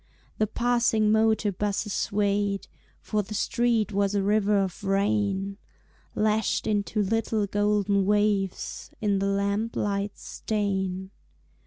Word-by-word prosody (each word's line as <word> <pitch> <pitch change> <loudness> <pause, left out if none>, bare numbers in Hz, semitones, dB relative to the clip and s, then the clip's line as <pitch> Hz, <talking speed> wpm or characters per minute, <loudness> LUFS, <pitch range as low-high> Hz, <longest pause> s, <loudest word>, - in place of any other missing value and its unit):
The 215 - +2
passing 235 -2 +2
motor 220 -1 +3
busses 205 +1 -2
swayed, 200 -1 0 0.3
For 215 - -1
the 210 +2 -7
street 230 -1 +1
was 200 0 +1
a 200 - +1
river 210 0 +2
of 195 +1 -2
rain, 200 0 0 0.6
Lashed 215 0 +1
into 210 0 0
little 220 +1 0
golden 205 -1 +1
waves 205 -2 0
In 200 -2 +1
the 195 - 0
lamp 200 +3 -1
light's 200 0 -2
stain. 190 -3 -2
205 Hz, 120 wpm, -26 LUFS, 200-215 Hz, 0.6 s, motor